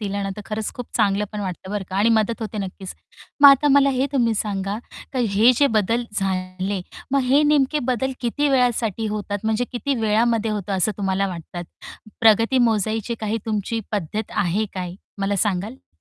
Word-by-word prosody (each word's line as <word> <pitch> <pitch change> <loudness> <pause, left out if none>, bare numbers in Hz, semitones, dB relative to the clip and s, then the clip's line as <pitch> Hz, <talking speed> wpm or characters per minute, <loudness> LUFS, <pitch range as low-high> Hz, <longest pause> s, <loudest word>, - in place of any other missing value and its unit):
दिला 200 -1 -3
ना, 195 - -3
तर - - -6
खरंच 215 0 -3
खूप 245 - -6
चांगलं 200 +1 +2
पण 210 - -4
वाटतं 190 0 -5
बरं 205 -2 -3
का 190 - -3
आणि 210 +3 +3
मदत 230 +2 -1
होते 215 -1 -5
नक्कीच. 190 -1 -6 0.5
मग 285 - +11
आता 275 +1 +5
मला 275 0 +5
हे 265 +1 +1
तुम्ही 235 -4 +2
सांगा, 200 0 -2 0.4
तर 260 - 0 0.2
हे 230 +5 +6
जे 285 - +4
बदल 230 +4 0 0.2
झाले, 185 0 -2 0.3
मग 275 - +4
हे 275 +4 +4
नेमके 295 0 +3
बदल 265 +2 -1
किती 275 +5 0
वेळासाठी 235 -5 +1
होतात? 205 -1 -3
म्हणजे 220 +2 +1
किती 255 +3 -1
वेळामध्ये 225 +1 +2
होतं 205 -1 -3
असं 190 +4 +1
तुम्हाला 195 0 0
वाटतात? 175 0 -7 0.6
प्रगती 225 +3 +4
मोजायची 225 -1 +1
काही 215 +1 -1
तुमची 220 +1 -2
पद्धत 210 +2 -3
आहे 205 +1 +1
काय? 180 -1 -4 0.2
मला 200 0 0
सांगाल? 205 +6 -4
215 Hz, 180 wpm, -22 LUFS, 195-240 Hz, 0.6 s, मग